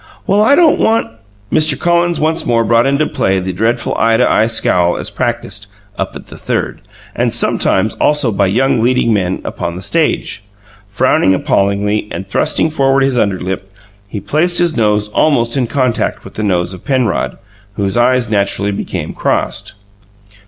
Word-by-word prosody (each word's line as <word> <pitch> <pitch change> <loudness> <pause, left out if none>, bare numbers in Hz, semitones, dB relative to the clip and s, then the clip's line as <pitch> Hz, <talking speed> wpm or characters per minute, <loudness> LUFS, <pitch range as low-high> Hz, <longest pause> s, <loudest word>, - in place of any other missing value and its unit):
"Well, 200 +2 +2
I 225 +6 +5
don't 325 -1 +4
want 225 - +1 0.2
" 100 0 -16
Mr. 155 0 +3
Collins 175 0 +1
once 160 +2 0
more 115 -1 +1
brought 115 +3 +2
into 140 +3 +1
play 95 -8 0
the 95 0 -3
dreadful 115 +5 -1
eye 115 0 +3
to - - +3
eye 110 - +2
scowl 90 -6 +1
as - - -4
practised 100 0 -3 0.3
"up - - -4
at - - -9
the - - -12
Third," - - -3 0.3
and, - - 0
sometimes, - - +1
also 145 -5 +3
by 100 -1 +1
young 115 +4 +1
leading 120 -1 +2
men 95 -3 -1
upon 85 0 -4
the 90 - -7
stage. 155 - -1 0.5
Frowning 95 -2 +2
appallingly, 100 +3 0
and 95 - -5
thrusting 155 +9 0
forward 135 -2 +2
his 135 -1 +1
underlip, 95 -1 -2 0.4
he 100 - -6
placed 155 - 0
his 175 -2 +2
nose 105 -2 +1
almost 120 -1 +1
in 130 -3 0
contact 130 -2 -1
with - - -12
the - - -5
nose 90 -3 0
of 90 - -11
Penrod, 130 -7 -1 0.4
whose 100 -2 -1
eyes 125 0 +2
naturally 100 -1 0
became 100 - -5
crossed. - - -2
115 Hz, 170 wpm, -14 LUFS, 100-140 Hz, 0.5 s, I